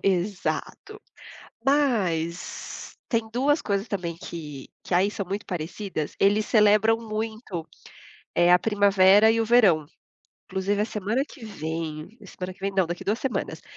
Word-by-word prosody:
exato. 195 +1 -2 0.7
Mas, 195 - -1
tem 230 -2 +2
2 285 +5 +2
coisas 200 +1 -1
também 175 -4 -3
que 150 -6 -8 0.2
que - - -4
aí 185 +3 +4
são 200 -2 -4
muito 200 +3 -4
parecidas, 175 -1 -4
eles 205 +2 +3
celebram 215 0 +4
muito, 220 -5 -5 0.7
eh, 175 +1 +5
a 180 - +7
primavera 205 0 +5
e 230 - +1
o 225 - +1
verão. 200 -10 +4 0.7
Inclusive, 195 +2 0
a - - +2
semana 215 +4 -1
que 245 - -12
vem 160 0 -5
a 200 - -12
semana 185 0 -6
que 185 - -22
vem 195 0 -2
não, 190 -2 +2
daqui 175 +1 -5
a - - -30
duas 215 +3 +1
semanas. 265 -3 -3
200 Hz, 155 wpm, -25 LUFS, 175-220 Hz, 0.7 s, a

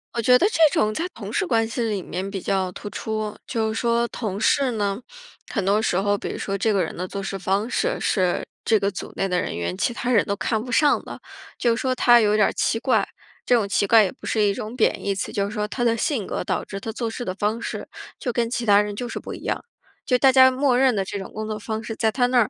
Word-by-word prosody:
我 235 - 0
觉 250 +2 +5
得 380 - +4
这 330 - -1
种 215 0 +1
在 325 - -2
同 - - -8
事 420 -2 +1
关 225 -8 +1
系 230 +2 -3
里 215 -4 -1
面 185 +3 -5
比 195 - -3
较 190 -1 -1
突 205 - -8
出。 215 0 -4
就 220 -1 -1
是 - - -2
说 235 0 +2
同 205 -5 -4
事 265 +4 +2
呢， 205 -1 -2 0.5
很 200 - -1
多 205 +2 +3
时 200 -5 +1
候， 205 +1 +1
比 - - -5
如 - - -5
说 195 0 -3
这 220 +3 +1
个 200 -2 +2
人 - - -7
的 180 - -4
做 195 +2 -5
事 195 0 -4
方 195 +4 -1
式， - - 0
是 185 -4 0 0.2
这 220 - +3
个 200 0 +1
组 195 - -7
内 195 - 0
的 180 -1 0
人 - - -4
员 85 +1 -3
其 240 - 0
他 240 +1 -3
人 - - +5
都 200 - -1
看 215 +2 -1
不 250 - -7
上 290 +2 +3
的， - - -9 0.4
就 235 -2 +2
说 255 +2 0
他 240 -1 +5
有 210 0 +3
点 210 - +5
儿 - - -2
奇 225 - 0
怪。 225 -5 +2 0.4
这 - - +2
种 220 -4 +1
奇 200 0 +1
怪 220 +2 +6
也 185 - -3
不 - - -14
是 220 - 0
一 205 -1 +3
种 215 +3 -6
贬 - - +1
义 200 - +1
词， 195 - -4
就 200 - 0
是 200 - -5
说 210 -1 -2
他 240 +3 -3
的 230 -1 +2
性 250 - -1
格 - - -4
导 - - -1
致 195 - -7
他 220 +2 -6
做 230 0 -3
事 245 - -5
的 185 - -3
方 210 +3 -1
式， - - -5 0.3
就 250 - -3
跟 235 0 0
其 240 -1 -2
他 205 -1 +6
人 210 -1 -4
就 240 +3 -4
是 - - -4
不 - - -7
一 - - -9
样。 - - -2 0.4
就 250 - +3
大 265 +1 +5
家 260 0 +7
默 260 -1 +2
认 260 -3 +4
的 195 - +1
这 200 +1 -5
种 190 - -7
工 215 0 -4
作 215 -1 -4
方 220 +1 -4
式， 225 - -5
在 220 -1 +1
他 245 +1 +2
那 250 0 +3
儿， 220 - +2
220 Hz, 305 characters per minute, -23 LUFS, 200-240 Hz, 0.5 s, 家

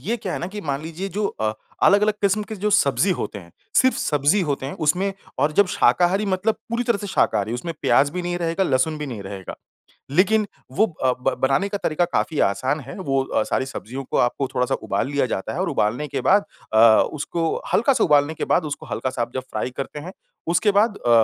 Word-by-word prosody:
ये 230 +8 -1
क्या 195 -5 -5
है - - -2
ना 175 - -4
कि 210 +1 -7
मान 140 -4 -3
लीजिए 165 +5 -5
जो 210 -1 +1
अ, 110 - -2 0.3
अलग-अलग 210 +1 +5
किस्म 200 +2 +2
के 220 +1 -7
जो 210 +2 -1
सब्ज़ी 190 0 +3
होते 110 - -4
हैं 85 -3 -15 0.2
सिर्फ़ 260 0 +4
सब्ज़ी 150 +7 +2
होते 135 -1 -2
हैं 140 - -5
उसमें 190 +6 +2 0.3
और 150 +1 +2
जब 200 +4 +4
शाकाहारी 185 +3 +2
मतलब 195 +3 +1 0.2
पूरी 235 +1 0
तरह 230 -4 +1
से 205 - -5
शाकाहारी 110 - +1
उसमें 165 +7 -4
प्याज़ 145 +1 +4
भी 180 0 -3
नहीं 175 0 -2
रहेगा, 170 +2 0
लहसुन 145 +2 +1
भी 150 - -4
नहीं 115 -6 -6
रहेगा। 95 -1 -7 0.6
लेकिन 210 +6 +3 0.3
वो 220 - +3 0.2
अ, 130 - +4
ब 135 0 +1
बनाने 135 +10 +2
का 205 - -2
तरीका 175 -1 0
काफ़ी 160 -3 -1
आसान 130 +9 +1
है 135 +5 -9
वो 135 -6 0
अ, - - 0
सारी 130 - -1
सब्ज़ियों 135 0 -6
को - - -3
आपको 135 +2 -3
थोड़ा-सा 125 +2 +1
उबाल - - -1
लिया 140 -2 +1
जाता 95 -6 -3
है - - -4
और - - 0
उबालने 120 +8 0
के 140 - -3
बाद 200 +1 +4 0.3
अ, - - +3 0.4
उसको 160 +2 -2
हल्का 265 +5 +4
सा 240 - +2
उबालने 145 0 +3
के - - -4
बाद - - +2
उसको 145 - -5
हल्का-सा 130 -2 -3
आप 120 - -2
जब 130 - -2
फ्राई - - -2
करते 140 +2 -5
हैं। 175 +5 -8 0.4
उसके 200 +5 +3
बाद 205 +1 +2
अ, 120 - -3
160 Hz, 225 wpm, -22 LUFS, 135-200 Hz, 0.6 s, अलग-अलग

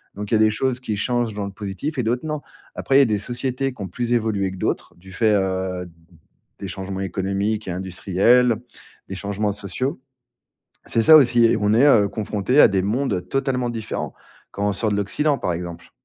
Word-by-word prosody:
Donc, 105 0 -6
il - - +1
y - - +5
a - - 0
des 110 0 +5
choses 125 +3 -1
qui 110 -4 -3
changent 120 +1 -1
dans 100 0 -4
le 100 - -6
positif 100 - -5
et 125 - 0
d'autres 120 +5 -1
non. 150 -1 -3 0.3
Après, 135 - +2
il - - +8
y - - +8
a - - +5
des 110 -3 0
sociétés 125 +4 -3
qui 125 - -12
ont 95 - -3
plus 120 +6 -4
évolué 110 -5 0
que 95 - -9
d'autres, - - -3
du 95 +2 -14
fait, 110 +2 +2
heu, 95 -2 -1 0.7
des 100 - -5
changements 95 0 -5
économiques 100 +2 -2
et - - -2
industriels, 100 +6 +2 0.5
des 95 - -6
changements 100 +1 -2
sociaux. 130 - -4 0.8
C'est 115 - +1
ça 155 +6 +9
aussi, 120 -4 +4
et 115 - +3
on 105 0 +1
est, 120 +6 +5
heu, 110 -8 +5
confronté 105 +5 0
à - - +8
des 95 -1 0
mondes, 120 +8 -1
heu, 90 - -1
totalement 125 +5 -1
différents 115 -2 -5 0.4
quand 100 +1 -2
on 100 - +1
sort 110 +2 -1
de - - +1
l'Occident, 140 +9 0
par 90 - -2
exemple. 85 0 -7
105 Hz, 215 wpm, -22 LUFS, 95-125 Hz, 0.8 s, ça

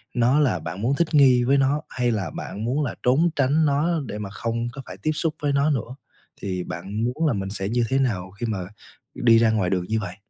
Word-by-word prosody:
nó 125 +4 +3
là 145 -4 +2
bạn 85 +4 -6
muốn 125 +5 +1
thích 170 -1 0
nghi 130 -4 +6
với 135 +3 +3
nó 140 +2 +2
hay 125 -1 0
là 100 -6 -2
bạn 100 +4 -5
muốn 135 +6 0
là 130 - -3
trốn 140 +8 +3
tránh 145 +3 +2
nó 145 +3 +2 0.2
để 105 - -5
mà 105 -2 -5
không 115 +3 -3
có 135 - -7
phải - - -9
tiếp 155 - +2
xúc 155 0 0
với 145 -1 +1
nó 140 +2 +2
nữa. 125 -2 -3 0.5
Thì 90 -2 -3
bạn 95 +7 -5
muốn 125 +7 0
là 145 - +2
mình 95 -2 -3
sẽ 95 -1 -3
như 120 +2 +1
thế 135 - +2
nào 100 -9 -1
khi 100 +5 -5
mà 110 -4 -2 0.6
đi 115 -1 +5
ra 115 -1 +4
ngoài 105 -5 +1
đường 90 -1 0
như 110 0 +1
vậy? 100 -4 -6
120 Hz, 250 wpm, -24 LUFS, 105-140 Hz, 0.6 s, nghi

